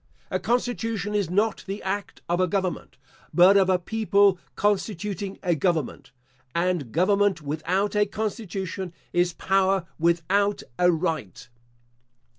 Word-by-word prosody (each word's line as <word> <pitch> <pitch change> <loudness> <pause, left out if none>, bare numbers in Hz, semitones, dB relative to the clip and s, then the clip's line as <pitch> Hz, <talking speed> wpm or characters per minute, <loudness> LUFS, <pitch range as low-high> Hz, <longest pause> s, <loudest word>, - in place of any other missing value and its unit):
A - - 0
constitution 230 -3 -1
is 200 -5 0
not 205 +4 +1
the 195 +2 -5
act 200 +1 -4
of 175 +1 0
a 185 - +3
government, 185 -1 -3 0.3
but 180 +3 +6
of 190 -1 +4
a 185 - +4
people 200 -1 +2 0.2
constituting 205 -1 -1
a 175 -2 +2
government; 160 -3 -1 0.5
and 170 -7 0
government 195 - +2
without 175 +8 -1
a 210 0 +3
constitution, 195 -4 -4 0.2
is 175 0 +2
power 190 0 +1
without 180 +5 +1 0.2
a 180 0 +5
right. 160 - -3
190 Hz, 125 wpm, -25 LUFS, 175-205 Hz, 0.5 s, but